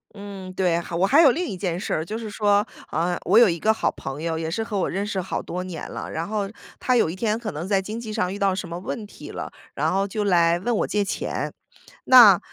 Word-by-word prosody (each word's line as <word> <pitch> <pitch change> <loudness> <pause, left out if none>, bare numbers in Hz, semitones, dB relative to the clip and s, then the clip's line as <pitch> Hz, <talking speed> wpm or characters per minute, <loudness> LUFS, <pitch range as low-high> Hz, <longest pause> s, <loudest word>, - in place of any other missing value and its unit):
嗯， 195 -2 -8
对， 180 -3 +1
还 170 0 -6
我 185 +3 +3
还 285 +9 +6
有 280 -6 +7
另 350 +6 -1
一 190 - -5
件 180 -2 -2
事 - - -3
儿， 160 - -1
就 215 +5 -4
是 225 -2 -6
说， 205 0 +2 0.3
呃， 175 +2 0
我 200 +5 +4
有 235 -5 +8
一 170 -1 -2
个 220 0 +3
好 - - 0
朋 135 +2 -7
友， 165 -1 -2
也 160 0 -3
是 225 +6 -2
和 210 -3 -4
我 - - 0
认 195 +3 -2
识 200 -2 -2
好 185 - -3
多 180 +1 -5
年 175 -3 -6
了。 - - -6
然 165 +2 -3
后 205 -2 -1 0.3
他 255 - +2
有 225 - +3
一 170 - -5
天 215 +1 0
可 225 -3 -5
能 160 +5 -5
在 195 -1 +2
经 215 +4 -5
济 220 -2 -6
上 185 -4 -1
遇 205 - -6
到 195 -1 +2
什 185 -3 -5
么 170 +1 -5
问 210 +3 -5
题 - - -11
了， - - -6 0.2
然 - - 0
后 195 +1 +1
就 210 +1 -2
来 170 -3 +3
问 235 +5 -1
我 - - 0
借 210 -1 +1
钱。 - - -3 0.5
那， 230 -8 +9
195 Hz, 285 characters per minute, -24 LUFS, 175-215 Hz, 0.5 s, 那